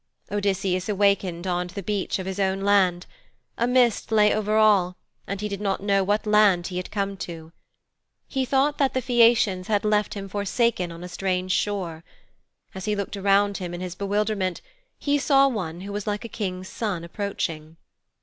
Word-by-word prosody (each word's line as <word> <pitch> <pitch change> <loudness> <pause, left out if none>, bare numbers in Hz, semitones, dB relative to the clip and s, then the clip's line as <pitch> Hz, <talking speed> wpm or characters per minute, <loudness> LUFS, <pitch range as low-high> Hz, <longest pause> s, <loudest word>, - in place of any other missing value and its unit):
Odysseus 195 -2 0
awakened 200 -3 +1
on 180 -1 -1
the 190 +3 -7
beach 205 0 -1
of 190 - -5
his 190 +1 -4
own 195 0 0
land. 190 -3 +3 0.5
A 235 - 0
mist 245 -3 +2
lay 210 -1 +5
over 215 0 0
all, 200 -4 +4 0.3
and 200 0 -3
he 210 - -1
did 200 -1 -5
not 195 -1 -1
know 200 -1 +2
what 205 +3 0
land 210 -4 +4
he 180 -1 -4
had 180 - -4
come 200 -1 -2
to. 165 -3 -8 0.8
He 265 -1 -1
thought 275 +3 +1
that 275 -2 +2
the 260 - +1
Phæacians 230 -6 +3
had 210 -1 +1
left 210 0 +1
him 195 -1 -5
forsaken 205 -1 0
on 170 +1 -9
a - - -6
strange 185 0 -2
shore. 185 -5 -1 0.7
As 190 -1 -6
he 210 -1 0
looked 200 0 -4
around 200 0 +2
him 175 -2 -5
in 175 - -7
his 180 -2 -4
bewilderment 200 -2 -1 0.4
he 290 0 +1
saw 275 0 +4
one 180 -9 -4
who 200 +1 -6
was 205 0 -4
like 210 +2 -2
a - - -3
King's 185 -4 -4
son 195 -7 -3
approaching. 165 -4 -4
200 Hz, 185 wpm, -24 LUFS, 185-210 Hz, 0.8 s, lay